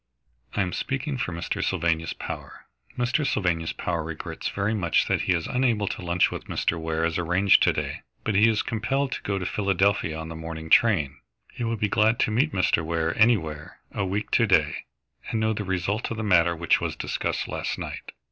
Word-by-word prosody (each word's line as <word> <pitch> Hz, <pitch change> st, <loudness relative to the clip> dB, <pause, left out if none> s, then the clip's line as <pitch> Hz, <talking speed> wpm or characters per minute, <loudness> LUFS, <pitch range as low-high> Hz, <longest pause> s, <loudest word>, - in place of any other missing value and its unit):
"I 100 Hz, -, +2 dB
am 90 Hz, -, -4 dB
speaking 135 Hz, 0 st, -2 dB
for 120 Hz, -, -2 dB
Mr. 85 Hz, 0 st, -3 dB
Sylvanus 80 Hz, -1 st, 0 dB
Power. -, -, -8 dB, 0.3 s
Mr. 125 Hz, +4 st, +1 dB
Sylvanus 90 Hz, -, 0 dB
Power 85 Hz, -2 st, -2 dB
regrets 80 Hz, 0 st, -5 dB
very 100 Hz, +2 st, -1 dB
much 95 Hz, -6 st, +1 dB
that -, -, +1 dB
he -, -, +2 dB
is 85 Hz, -2 st, -1 dB
unable 120 Hz, -5 st, +1 dB
to -, -, -5 dB
lunch 90 Hz, 0 st, +2 dB
with -, -, -6 dB
Mr. 85 Hz, -, -1 dB
Ware 80 Hz, 0 st, -1 dB
as 85 Hz, +1 st, -1 dB
arranged 90 Hz, +3 st, +4 dB
to -, -, +5 dB
day, -, -, -3 dB, 0.2 s
but 110 Hz, -, -1 dB
he 105 Hz, +3 st, +5 dB
is 110 Hz, -2 st, +1 dB
compelled 130 Hz, +5 st, -1 dB
to -, -, -3 dB
go 100 Hz, -1 st, -2 dB
to 95 Hz, -, -3 dB
Philadelphia 100 Hz, -4 st, +1 dB
on 80 Hz, 0 st, -5 dB
the 80 Hz, -, -7 dB
morning 80 Hz, 0 st, -7 dB
train. 75 Hz, -, +4 dB, 0.3 s
He -, -, -5 dB
will 115 Hz, 0 st, -1 dB
be 105 Hz, -, +1 dB
glad 110 Hz, +2 st, +3 dB
to -, -, +2 dB
meet 135 Hz, +8 st, +2 dB
Mr. 90 Hz, -5 st, +2 dB
Ware 80 Hz, 0 st, -1 dB
anywhere, 80 Hz, -10 st, +1 dB
a -, -, -2 dB
week 100 Hz, +3 st, -2 dB
to 115 Hz, -, +4 dB
day, 75 Hz, -6 st, +2 dB, 0.4 s
and 110 Hz, -, -1 dB
know 110 Hz, 0 st, +1 dB
the 105 Hz, -, -3 dB
result 95 Hz, +3 st, -1 dB
of 115 Hz, -, -4 dB
the 110 Hz, -, -2 dB
matter 85 Hz, -4 st, +4 dB
which 85 Hz, +1 st, +2 dB
was -, -, -2 dB
discussed -, -, -2 dB
last -, -, -3 dB
night." -, -, -6 dB
95 Hz, 205 wpm, -25 LUFS, 80-110 Hz, 0.4 s, to